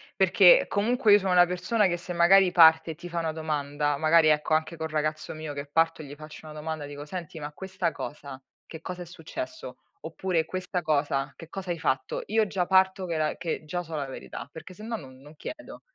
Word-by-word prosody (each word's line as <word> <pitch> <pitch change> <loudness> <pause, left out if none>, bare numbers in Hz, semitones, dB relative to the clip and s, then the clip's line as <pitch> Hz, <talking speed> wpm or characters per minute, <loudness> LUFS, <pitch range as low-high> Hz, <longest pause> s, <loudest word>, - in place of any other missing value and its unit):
perché - - +6
comunque 225 +2 +2
io 205 - +7
sono 190 -2 -1
una 175 0 +7
persona 180 +4 +1
che 175 -1 -1
se 180 +1 -7
magari 180 +2 +5
parte 160 -1 +6
e - - -8
ti 175 +2 -10
fa 170 - -2
una 160 -1 -1
domanda. 145 -2 -2
Magari, 160 +1 +4
ecco, 150 +1 +2
anche 160 +1 0
col 160 0 -4
ragazzo 155 0 -2
mio 155 -1 -6
che 140 0 -5
parto, 165 +2 +1
gli 145 -1 -9
faccio 155 +1 -12
una 155 - -9
domanda, 155 -1 -5
dico: 145 0 -8
“Senti, 170 -1 -7
ma 145 0 -6
questa 185 -1 -3
cosa, 140 -2 -8 0.2
che 160 - -10
cosa 180 +1 -6
è - - -12
successo?”. 310 - -8 0.2
Oppure: 175 -4 -1
“Questa 185 +1 -3
cosa, 145 -3 0
che 165 - -12
cosa 190 -1 -5
hai 170 - -3
fatto?”. 480 - -1
Io 220 -1 +2
già 185 -2 -1
parto 190 0 +3
che 170 -2 -2
la 155 -1 0
che 165 -2 -4
già 175 +3 -3
so 165 -1 -7
la 145 -2 -2
verità, 130 - -8
perché 170 +3 -10
sennò 220 +4 -6
non 130 -9 -10
non 150 +2 -15
chiedo. 300 - -9
165 Hz, 220 wpm, -27 LUFS, 155-185 Hz, 0.2 s, io